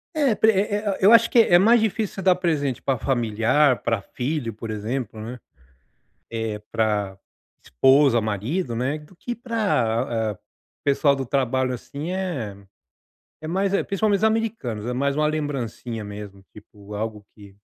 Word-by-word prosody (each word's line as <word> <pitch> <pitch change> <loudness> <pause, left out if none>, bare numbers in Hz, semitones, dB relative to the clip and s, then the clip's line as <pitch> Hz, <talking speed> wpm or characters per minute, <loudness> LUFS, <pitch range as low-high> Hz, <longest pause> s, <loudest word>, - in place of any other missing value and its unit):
É, 280 -7 +2
pre 220 +2 +5
é 205 +1 0
é, 205 -2 -1
eu 195 +3 +7
acho 230 0 +7
que 240 - +4
é 175 -6 +6
mais 225 +5 +5
difícil 220 -1 -1
você 195 - -5
dar 185 -1 +4
presente 150 -8 -1
pra 135 -3 0
familiar, 120 +3 +2
pra 115 -2 0
filho, 125 +3 -3
por 110 +2 -8
exemplo, 110 +2 -4
né, 120 +3 -7 0.9
eh, 110 -2 -3
pra 105 -3 -1 0.5
esposa, 130 - +4
marido, 115 - -2
né, 130 +6 -1
do 150 +5 -17
que 240 +7 -5
pra, 120 - -1
eh, - - -28 0.4
pessoal 140 0 +3
do 135 -1 -4
trabalho, 130 0 0
assim, 145 +6 -6
eh, 165 - -3 0.8
é 155 - -7
mais 190 +4 0
é 200 - +1
principalmente 200 +1 +1
os 210 - -1
americanos, 220 - -1
é 125 - -2
mais 140 +3 0
uma 150 +1 +1
lembrancinha 130 -7 -4
mesmo, 100 -1 -9
tipo, 105 -1 -14
algo 105 0 -4
que 100 -2 -15
135 Hz, 165 wpm, -23 LUFS, 110-185 Hz, 0.9 s, eu